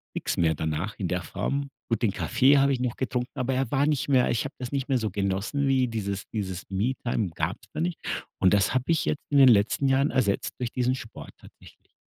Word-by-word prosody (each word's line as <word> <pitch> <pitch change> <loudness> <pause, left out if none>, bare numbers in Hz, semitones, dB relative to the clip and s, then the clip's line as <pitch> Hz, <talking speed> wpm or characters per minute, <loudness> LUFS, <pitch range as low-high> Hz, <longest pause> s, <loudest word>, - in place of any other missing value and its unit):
nix - - -2
mehr 80 -2 +2
danach 80 +7 -3
in 95 - -2
der 90 +1 -1
Form. 140 +10 -3 0.2
Gut, 115 - 0
den 115 - +2
Kaffee 135 +7 +3
habe 140 0 +4
ich 125 - -2
noch 125 -2 -1
getrunken, 125 -1 -2
aber 130 0 -1
er 130 -2 0
war 140 +1 +2
nicht 150 -2 0
mehr 130 -2 +4
ich 115 - 0
habe 135 - -7
das 125 0 -6
nicht 140 0 -2
mehr 130 - +3
so 110 -4 -2
genossen 100 +9 -1
wie 130 -2 +3
dieses 100 -4 -3
dieses 95 -4 -3
Me-Time 110 0 -1
gab's 90 +8 -3
da - - -4
nicht 175 0 -2 0.4
und 95 +1 +4
das 100 +4 +2
habe 130 0 0
ich 165 -3 +1
jetzt 145 - -1
in 145 - +2
den 135 - +8
letzten 115 +5 +3
Jahren 135 +2 +3
ersetzt 110 -7 0
durch 120 -2 -2
diesen 125 0 0
Sport 115 -4 -9
tatsächlich. - - -18
125 Hz, 230 wpm, -26 LUFS, 100-135 Hz, 0.4 s, den